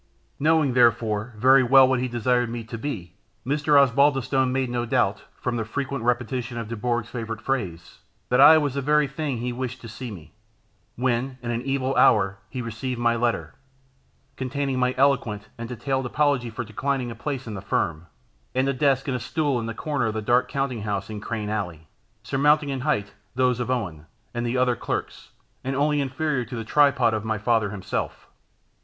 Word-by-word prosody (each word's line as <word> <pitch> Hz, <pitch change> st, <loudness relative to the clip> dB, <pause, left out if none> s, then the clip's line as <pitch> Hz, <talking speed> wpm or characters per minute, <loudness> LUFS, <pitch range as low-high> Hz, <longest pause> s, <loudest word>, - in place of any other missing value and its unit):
Knowing, 155 Hz, -3 st, +3 dB
therefore, 115 Hz, -2 st, +2 dB
very 130 Hz, +4 st, +6 dB
well 130 Hz, +1 st, +7 dB
what 130 Hz, -1 st, +1 dB
he 130 Hz, -, -1 dB
desired 120 Hz, 0 st, +1 dB
me 115 Hz, 0 st, -5 dB
to, 110 Hz, +1 st, -8 dB
be, 110 Hz, -, -5 dB, 0.3 s
Mr. 145 Hz, +1 st, +3 dB
Osbaldistone 135 Hz, -1 st, +3 dB
made 130 Hz, 0 st, 0 dB
no 120 Hz, -1 st, -1 dB
doubt, 105 Hz, -3 st, 0 dB
from 125 Hz, -1 st, -2 dB
the 115 Hz, -, -1 dB
frequent 135 Hz, +2 st, -4 dB
repetition 120 Hz, 0 st, -1 dB
of 115 Hz, -2 st, -4 dB
Dubourg's 115 Hz, +1 st, -2 dB
favourite 115 Hz, -2 st, -4 dB
phrase, 90 Hz, -11 st, -3 dB, 0.3 s
that 125 Hz, +2 st, +4 dB
I 155 Hz, +3 st, +9 dB
was 145 Hz, -4 st, 0 dB
the 140 Hz, -, -2 dB
very 150 Hz, +2 st, +3 dB
thing 140 Hz, -1 st, -3 dB
he 120 Hz, +1 st, -3 dB
wished 130 Hz, 0 st, -4 dB
to 115 Hz, -, -9 dB
see 120 Hz, +3 st, -7 dB
me; 90 Hz, -7 st, -11 dB, 0.6 s
when, 125 Hz, +1 st, -1 dB
in 120 Hz, -, -2 dB
an 120 Hz, 0 st, -2 dB
evil 135 Hz, 0 st, -1 dB
hour, 95 Hz, -4 st, +4 dB
he 125 Hz, -2 st, -5 dB
received 115 Hz, +2 st, -4 dB
my 120 Hz, 0 st, +2 dB
letter, 120 Hz, 0 st, -1 dB, 0.8 s
containing 135 Hz, 0 st, -2 dB
my 125 Hz, 0 st, +1 dB
eloquent 125 Hz, -7 st, +1 dB
and 115 Hz, 0 st, -7 dB
detailed 130 Hz, +2 st, -2 dB
apology 140 Hz, -3 st, +1 dB
for 110 Hz, -, -5 dB
declining 125 Hz, +3 st, -2 dB
a -, -, -7 dB
place 130 Hz, +2 st, -4 dB
in 110 Hz, -, -6 dB
the 95 Hz, -, -6 dB
firm, 85 Hz, 0 st, -1 dB, 0.5 s
and 130 Hz, +1 st, +2 dB
a 140 Hz, -, +1 dB
desk 135 Hz, 0 st, +1 dB
and 125 Hz, -3 st, -1 dB
stool 145 Hz, 0 st, 0 dB
in 115 Hz, -, -4 dB
the 115 Hz, -, -5 dB
corner 145 Hz, -5 st, -1 dB
of 110 Hz, -, -3 dB
the 110 Hz, -, -1 dB
dark 120 Hz, +3 st, +2 dB
counting 135 Hz, -5 st, -2 dB
house 100 Hz, 0 st, -3 dB
in 105 Hz, -1 st, -6 dB
Crane 105 Hz, -1 st, -3 dB
Alley, 90 Hz, -7 st, -4 dB, 0.4 s
surmounting 145 Hz, +4 st, +2 dB
in 135 Hz, -1 st, -2 dB
height 110 Hz, -8 st, -1 dB, 0.2 s
those 125 Hz, -1 st, +2 dB
of 120 Hz, -, -2 dB
Owen, 90 Hz, -12 st, -3 dB, 0.3 s
and 120 Hz, 0 st, -2 dB
the 120 Hz, +2 st, -1 dB
other 125 Hz, -1 st, +3 dB
clerks, -, -, -4 dB, 0.3 s
and 135 Hz, +1 st, -2 dB
only 145 Hz, +1 st, +2 dB
inferior 140 Hz, 0 st, -1 dB
to 120 Hz, +2 st, -8 dB
the 115 Hz, -1 st, -5 dB
tripod 140 Hz, -3 st, +3 dB
of 110 Hz, -1 st, -2 dB
my 110 Hz, 0 st, -1 dB
father 110 Hz, 0 st, +1 dB
himself. 100 Hz, -2 st, -4 dB
125 Hz, 190 wpm, -24 LUFS, 115-135 Hz, 0.8 s, I